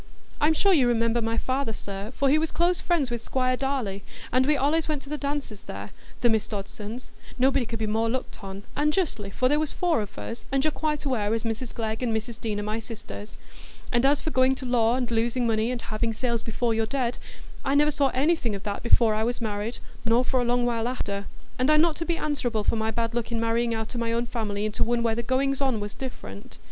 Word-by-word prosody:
I'm 310 +2 +4
sure 395 +4 +4
you 270 -7 +5
remember 230 0 +2
my 225 0 -1
father, 260 -2 0
sir, 200 +1 -6
for 275 - +2
he 295 +3 +5
was 320 0 0
close 345 +1 +2
friends 320 -8 +1
with 235 -1 -3
Squire 255 -1 +1
Darleigh, 250 -8 -2 0.3
and 255 +2 +3
we 300 - +4
allays 300 +4 +2
went 300 -3 -2
to 275 - -12
the 300 - -1
dances 280 -7 -3
there, 100 +1 -7 0.3
the 240 - +5
Miss 220 -2 +1
Dodsons,—nobody 235 +5 -2
could 230 - -3
be 220 - -1
more 220 +2 +1
looked 250 -3 -4
on,—and 205 +10 -2
justly, 260 - -1
for 255 +6 +1
there 295 +3 +3
was 310 -1 -1
four 345 -9 +2
of 205 - -7
us, 230 - -6
and 270 0 +2
you're 310 - +3
quite 300 -1 -1
aware 225 -5 +1
as 225 - -2
Mrs 230 +1 -3
Glegg 220 0 -3
and 230 -3 +1
Mrs 225 +1 -6
Deane 215 -3 -1
are - - -2
my 215 +2 -2
sisters. 220 -2 -8 0.6
And 240 0 +3
as 280 +1 +4
for 315 - -2
going 260 0 +4
to 260 - -7
law 240 -1 +3
and 250 -2 -1
losing 235 +2 +1
money, 225 0 +2
and 250 -1 -2
having 225 +1 -1
sales 235 0 0
before 230 +1 0
you're 220 0 +1
dead, 250 -2 -1 0.4
I 275 - +1
never 295 +1 +5
saw 280 -1 +3
anything 265 -4 +1
o' - - -4
that 205 -1 -3
before 235 -2 +5
I 215 +1 +1
was 240 +2 -1
married, 215 0 -2 0.3
nor 235 +2 +3
for 255 -1 +2
a - - +1
long 245 0 +2
while 235 -1 0
after. 200 -5 -3 0.3
And 255 +3 +3
I'm 305 0 +6
not 330 -1 +3
to 330 - -2
be 340 -1 0
answerable 245 -8 -1
for - - +2
my 220 0 0
bad 230 +1 -1
luck 240 0 -2
i' - - -1
marrying 230 +1 +1
out 220 +2 -4
o' - - -1
my 230 0 0
own 235 +1 +1
family 215 -3 -2
into 215 0 0
one 235 0 +1
where 230 -1 +2
the 235 - -1
goings 270 +3 +1
on 260 -5 +2
was 205 0 -5
different. 100 - -8
235 Hz, 240 wpm, -26 LUFS, 220-270 Hz, 0.6 s, I'm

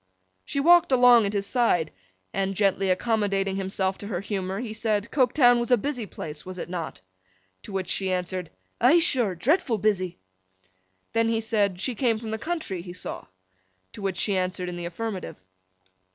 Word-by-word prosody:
She 280 - -3
walked 345 +1 +5
along 245 -4 +6
at 200 - -4
his 200 -1 -1
side, 200 -9 +1 0.4
and, 195 0 -1
gently 195 -1 +1
accommodating 195 -1 0
himself 190 0 -1
to 205 - -7
her 190 -5 -2
humour, 195 -1 -3
he 230 -3 -5
said 215 -1 -1
Coketown 245 -2 +4
was 235 - -2
a 245 - +5
busy 245 -1 -3
place, 150 -4 -7
was 185 0 -8
it 175 - -6
not? 170 - -5 0.6
To - - -10
which 190 -2 -3
she 190 -1 0
answered 180 -1 -2 0.3
'Eigh 260 +8 +6
sure! 245 - +2
Dreadful 255 - +1
busy!' 190 -4 0 1.0
Then 230 0 +2
he 225 -1 +1
said, 210 -5 0
she 250 +6 -1
came 230 -1 +1
from 220 0 -6
the 220 - -3
country, 310 - -3
he 175 0 -9
saw? 180 - -6 0.7
To - - -9
which 195 -2 -2
she 200 - +1
answered 185 -1 -2
in 175 - -5
the 175 0 -5
affirmative. 195 +2 -5
205 Hz, 180 wpm, -26 LUFS, 185-235 Hz, 1.0 s, along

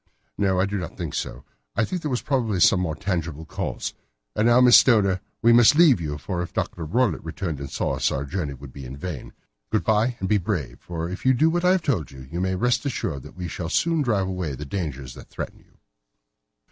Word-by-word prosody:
"No, 95 -2 +1
I 95 - +3
do 100 0 -2
not 85 - -7
think - - -4
so. - - -4 0.3
I 110 - +2
think 180 +6 -4
that - - -10
there - - 0
was 125 -2 -2
probably 120 -9 0
some 90 +2 +5
more 80 -4 -1
tangible 80 -3 -3
cause. - - -4 0.4
And 110 - +2
now, 120 +1 +6
Miss 125 -3 +8
Stoner, 100 -5 +5 0.2
we 115 +1 +6
must 120 +3 +7
leave 150 - +6
you 75 -2 -3
for 90 +4 -3
if 85 - -6
Dr. 85 - -3
Roylott 120 +11 +1
returned 80 -2 -4
and 70 -1 -6
saw - - -1
us - - +2
our 70 +1 -2
journey 75 -2 -3
would 65 0 -12
be 70 - -9
in 65 +2 -8
vain. 80 -2 -6 0.4
Good 110 - +1
bye, 110 +3 +2
and 95 - -2
be 105 0 +3
brave, 85 - -3
for 85 -1 -5
if 95 +3 -6
you 130 - +5
will 120 - -2
do 160 +2 +5
what 175 +1 0
I 180 - +6
have 185 -3 0
told 110 - 0
you, 65 -1 -11
you 85 +2 -2
may 95 0 0
rest 125 +8 +1
assured 85 - -3
that - - -13
we 90 -1 -4
shall 80 0 -5
soon 165 - +1
drive 105 -8 +1
away 90 -7 -3
the 75 - -7
dangers 70 -7 -4
that - - -13
threaten - - -6
you." - - -27
95 Hz, 245 wpm, -24 LUFS, 80-120 Hz, 0.4 s, Miss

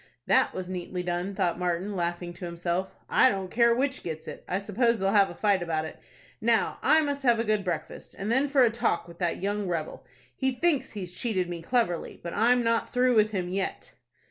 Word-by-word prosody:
"That - - +4
was 185 -1 -4
neatly 180 0 -4
done," 180 +2 -2
thought 180 -3 0
Martin, 180 +3 -1
laughing 175 0 -3
to 175 - -8
himself. 175 +2 -3
"I - - +5
don't 190 -3 -3
care 235 0 +4
which 265 +1 -1
gets 160 -2 -6
it. - - -8
I 185 - 0
suppose 225 +4 +1
they'll 195 -1 +1
have 200 -2 +4
a 175 - -9
fight 200 -2 +2
about 160 -2 -1
it. 160 - -9 0.4
Now 230 0 +1
I 310 +3 +5
must 285 -2 -2
have 240 -3 +4
a 230 - 0
good 215 -2 0
breakfast, 175 -4 -5
and 200 +3 -3
then 265 +4 +3
for 275 -2 +5
a 235 - +4
talk 225 -7 0
with 170 0 -13
that 175 0 -1
young 205 0 -1
rebel. 165 -3 -3 0.3
He 265 -1 0
thinks 305 +1 +1
he's 185 -4 -6
cheated 190 -6 -1
me 175 -1 -5
cleverly, 200 -3 -1
but 170 - -5
I'm 240 +3 +3
not 230 0 +1
through 250 0 +2
with 215 -2 +4
him 185 -4 -2
yet." 190 +1 -3
195 Hz, 220 wpm, -27 LUFS, 175-235 Hz, 0.4 s, I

